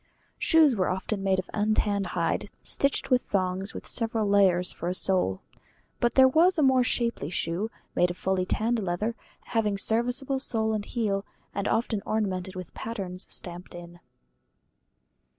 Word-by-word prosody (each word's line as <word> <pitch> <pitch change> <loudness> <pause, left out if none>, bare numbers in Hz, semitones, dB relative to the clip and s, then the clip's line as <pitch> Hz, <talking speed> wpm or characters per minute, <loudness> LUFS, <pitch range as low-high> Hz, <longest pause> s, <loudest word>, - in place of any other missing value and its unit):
Shoes 315 -5 +5
were 185 -3 +1
often 190 +2 -2
made 190 -1 +2
of 185 - -3
untanned 210 -2 +1
hide 170 +4 0
stitched 275 0 0
with 250 -1 +5
thongs, 190 +1 -2
with - - -7
several 225 -2 -1
layers 190 -3 +4
for 170 - -4
a 180 - -2
sole. 180 - +2 0.6
But 240 - +1
there 265 -1 +8
was 335 +7 +4
a 305 - +3
more 260 -2 +5
shapely 235 - 0
shoe, 175 +4 -2 0.2
made 180 - +3
of 175 - -6
fully 185 -1 -1
tanned 230 +2 0
leather, 200 +4 -1 0.3
having 215 -3 0
serviceable 245 +6 0
sole 220 -4 -1
and 210 -1 -2
heel, 205 -5 -1 0.3
and 200 +1 -2
often 225 -3 0
ornamented 190 -4 -2
with 185 -2 -8
patterns 190 -5 -4
stamped 175 0 -7
in. 175 0 -11
205 Hz, 155 wpm, -27 LUFS, 185-235 Hz, 0.6 s, there